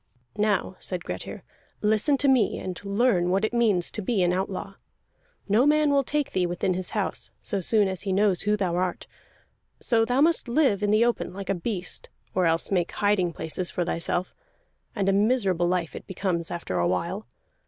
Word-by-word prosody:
"Now," 205 Hz, -3 st, 0 dB
said 180 Hz, -2 st, -4 dB
Grettir, -, -, -6 dB, 0.4 s
"listen 220 Hz, +7 st, +3 dB
to 280 Hz, -, +1 dB
me, 255 Hz, -6 st, +3 dB
and 185 Hz, 0 st, -6 dB
learn 200 Hz, -3 st, +2 dB
what 195 Hz, +4 st, +2 dB
it 220 Hz, -, -3 dB
means 215 Hz, -7 st, +2 dB
to 215 Hz, -, -4 dB
be 200 Hz, -1 st, +1 dB
an 175 Hz, 0 st, +2 dB
outlaw. 195 Hz, +1 st, -3 dB, 0.7 s
No 220 Hz, +7 st, +4 dB
man 300 Hz, 0 st, +4 dB
will 280 Hz, -1 st, +3 dB
take 295 Hz, +2 st, -1 dB
thee 180 Hz, -1 st, +1 dB
within 175 Hz, +1 st, -1 dB
his 185 Hz, 0 st, -3 dB
house, -, -, -2 dB
so 200 Hz, -4 st, 0 dB
soon 210 Hz, +2 st, +3 dB
as 190 Hz, -1 st, -4 dB
he 195 Hz, -, -3 dB
knows 195 Hz, -1 st, +2 dB
who 210 Hz, +1 st, +1 dB
thou 185 Hz, -4 st, -1 dB
art. 180 Hz, -1 st, -2 dB, 0.7 s
So 230 Hz, -2 st, +2 dB
must 295 Hz, +7 st, +3 dB
thou 235 Hz, -, -5 dB
live 260 Hz, -9 st, +3 dB
in 205 Hz, -, +1 dB
the 215 Hz, +3 st, +4 dB
open, 240 Hz, -6 st, -1 dB
like 200 Hz, -1 st, -7 dB
a -, -, +3 dB
beast, 180 Hz, -1 st, -3 dB, 0.2 s
or 185 Hz, -2 st, +2 dB
else 165 Hz, +3 st, +1 dB
make 175 Hz, -3 st, 0 dB
hiding 205 Hz, -4 st, +1 dB
places 170 Hz, +2 st, -2 dB
for 175 Hz, -, -2 dB
thyself. 175 Hz, +2 st, -1 dB, 0.6 s
And 200 Hz, -3 st, -1 dB
a 195 Hz, -, +4 dB
miserable 200 Hz, -5 st, +2 dB
life 175 Hz, -2 st, -1 dB
it -, -, -9 dB
becomes 180 Hz, -3 st, -2 dB
after 170 Hz, -, -3 dB
a 85 Hz, -, +2 dB
while. 170 Hz, -, -2 dB
195 Hz, 195 wpm, -26 LUFS, 180-220 Hz, 0.7 s, No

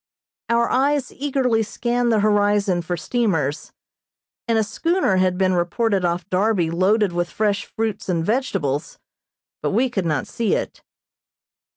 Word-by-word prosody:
Our 235 Hz, 0 st, +3 dB
eyes 275 Hz, 0 st, +1 dB
eagerly 260 Hz, -5 st, 0 dB
scanned 240 Hz, +2 st, -1 dB
the 215 Hz, -2 st, +3 dB
horizon 205 Hz, -3 st, +2 dB
for 175 Hz, +1 st, -3 dB
steamers, 165 Hz, -, -1 dB, 0.8 s
and 230 Hz, -1 st, +2 dB
a 220 Hz, -, +3 dB
schooner 275 Hz, -, 0 dB
had 185 Hz, -1 st, +2 dB
been 185 Hz, -1 st, +2 dB
reported 190 Hz, +3 st, 0 dB
off 175 Hz, +1 st, -1 dB
Darby 185 Hz, -3 st, +1 dB
loaded 190 Hz, +3 st, +2 dB
with 175 Hz, 0 st, -1 dB
fresh 210 Hz, 0 st, -1 dB
fruits 220 Hz, -3 st, -4 dB
and 165 Hz, -2 st, 0 dB
vegetables, 180 Hz, -, -1 dB, 0.6 s
but -, -, 0 dB
we 245 Hz, +5 st, +1 dB
could 195 Hz, -7 st, -1 dB
not 150 Hz, -4 st, 0 dB
see 230 Hz, -3 st, -1 dB
it. -, -, -4 dB
205 Hz, 145 wpm, -21 LUFS, 180-235 Hz, 0.8 s, Our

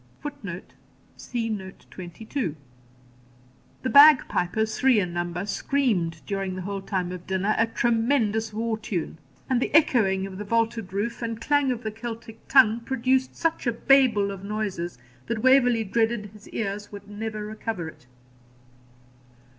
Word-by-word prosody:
[Footnote: 205 Hz, -12 st, -7 dB, 0.4 s
See 235 Hz, -2 st, -4 dB
Note 195 Hz, -4 st, -6 dB
22.] 185 Hz, -, -5 dB, 1.3 s
The 260 Hz, -, 0 dB
bag 290 Hz, 0 st, +8 dB
pipers, 215 Hz, +5 st, -1 dB
three 255 Hz, -4 st, +5 dB
in 180 Hz, -3 st, -2 dB
number, 175 Hz, +1 st, -3 dB
screamed, 200 Hz, -, 0 dB
during 195 Hz, -2 st, -3 dB
the 185 Hz, -, -5 dB
whole 200 Hz, +1 st, -4 dB
time 185 Hz, -2 st, -2 dB
of 180 Hz, -1 st, -8 dB
dinner, 190 Hz, +2 st, +1 dB
a 225 Hz, -, +4 dB
tremendous 225 Hz, -1 st, +1 dB
war 220 Hz, +1 st, -2 dB
tune; 175 Hz, -6 st, -4 dB, 0.3 s
and 255 Hz, -2 st, +1 dB
the -, -, -1 dB
echoing 200 Hz, -11 st, +4 dB
of 190 Hz, 0 st, -8 dB
the -, -, -3 dB
vaulted 230 Hz, -1 st, -1 dB
roof, 210 Hz, +5 st, -3 dB
and 230 Hz, -1 st, -3 dB
clang 285 Hz, +1 st, +2 dB
of 245 Hz, -1 st, -4 dB
the 220 Hz, -, -3 dB
Celtic 225 Hz, 0 st, -8 dB
tongue, 235 Hz, -4 st, +5 dB
produced 260 Hz, +1 st, 0 dB
such 330 Hz, -5 st, -1 dB
a -, -, +3 dB
Babel 230 Hz, -4 st, +3 dB
of 195 Hz, -1 st, -8 dB
noises 200 Hz, -6 st, -3 dB, 0.3 s
that 225 Hz, -2 st, -3 dB
Waverley 245 Hz, -3 st, +5 dB
dreaded 225 Hz, 0 st, 0 dB
his 210 Hz, -1 st, -15 dB
ears 205 Hz, -1 st, -4 dB
would 205 Hz, 0 st, -10 dB
never 215 Hz, 0 st, -5 dB
recover 215 Hz, -4 st, -4 dB
it. 140 Hz, -5 st, -13 dB
220 Hz, 150 wpm, -25 LUFS, 195-235 Hz, 1.3 s, bag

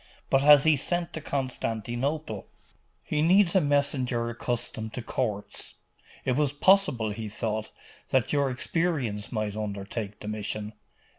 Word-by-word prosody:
But 135 Hz, -, +5 dB
has 145 Hz, -1 st, +8 dB
he 155 Hz, -2 st, +5 dB
sent 175 Hz, +5 st, -1 dB
to 160 Hz, -, -5 dB
Constantinople?' 130 Hz, -1 st, -3 dB, 0.6 s
'He 150 Hz, -, -1 dB
needs 185 Hz, +3 st, +4 dB
a 190 Hz, -, +6 dB
messenger 135 Hz, -5 st, +1 dB
accustomed 115 Hz, -2 st, -3 dB
to 125 Hz, -, -4 dB
courts. 110 Hz, -4 st, -3 dB, 0.5 s
It 130 Hz, -, +2 dB
was 145 Hz, -1 st, +1 dB
possible, 145 Hz, -, +3 dB
he 110 Hz, 0 st, -5 dB
thought, 110 Hz, 0 st, -3 dB, 0.4 s
that 130 Hz, 0 st, +2 dB
your 140 Hz, -2 st, +2 dB
experience 130 Hz, -, -1 dB
might 110 Hz, -3 st, -2 dB
undertake 105 Hz, 0 st, -4 dB
the 105 Hz, -, -8 dB
mission. 105 Hz, 0 st, -3 dB
125 Hz, 135 wpm, -27 LUFS, 110-145 Hz, 0.6 s, has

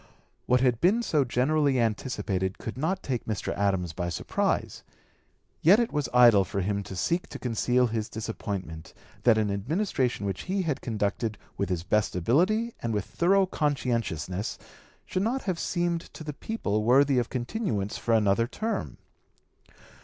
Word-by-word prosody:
What 125 Hz, 0 st, +4 dB
had 125 Hz, -3 st, +2 dB
been 210 Hz, +7 st, +3 dB
so 150 Hz, -9 st, +2 dB
generally 135 Hz, +2 st, +2 dB
anticipated 105 Hz, -5 st, -1 dB
could 115 Hz, -, -6 dB
not 160 Hz, +8 st, -1 dB
take 125 Hz, -4 st, -2 dB
Mr. 110 Hz, -2 st, -2 dB
Adams 95 Hz, -4 st, 0 dB
by 85 Hz, +1 st, -3 dB
surprise; 85 Hz, -, -1 dB, 0.8 s
yet 190 Hz, +8 st, +6 dB
it 235 Hz, -, 0 dB
was 150 Hz, -1 st, -1 dB
idle 120 Hz, -5 st, +7 dB
for 100 Hz, +1 st, -3 dB
him 100 Hz, +2 st, -1 dB
to 95 Hz, -, -7 dB
seek 170 Hz, -, 0 dB
to -, -, -7 dB
conceal 125 Hz, +1 st, +1 dB
his 110 Hz, -2 st, -2 dB
disappointment 100 Hz, -7 st, -5 dB, 0.3 s
that 115 Hz, -3 st, +6 dB
an 105 Hz, -2 st, +1 dB
Administration 125 Hz, -, -1 dB
which 95 Hz, -2 st, -3 dB
he -, -, 0 dB
(p. 195 Hz, -, +1 dB
213) -, -, -6 dB
had 150 Hz, -4 st, -1 dB
conducted 105 Hz, 0 st, -2 dB, 0.2 s
with 100 Hz, -, -2 dB
his 90 Hz, -3 st, -1 dB
best 105 Hz, +2 st, +1 dB
ability 185 Hz, -, +2 dB
and 115 Hz, -2 st, -1 dB
with 105 Hz, -, -1 dB
thorough 195 Hz, +3 st, +3 dB
conscientiousness 115 Hz, -, -2 dB, 0.5 s
should 185 Hz, -, -2 dB
not 245 Hz, +6 st, 0 dB
have 185 Hz, -4 st, -2 dB
seemed 175 Hz, -1 st, 0 dB
to -, -, -8 dB
the 150 Hz, -1 st, -5 dB
people 110 Hz, -, -2 dB
worthy 135 Hz, +3 st, +4 dB
of 120 Hz, -, -2 dB
continuance 120 Hz, -, -2 dB
for 115 Hz, -, +2 dB
another 110 Hz, +1 st, +3 dB
term. 220 Hz, -, -3 dB
120 Hz, 165 wpm, -27 LUFS, 100-155 Hz, 0.8 s, idle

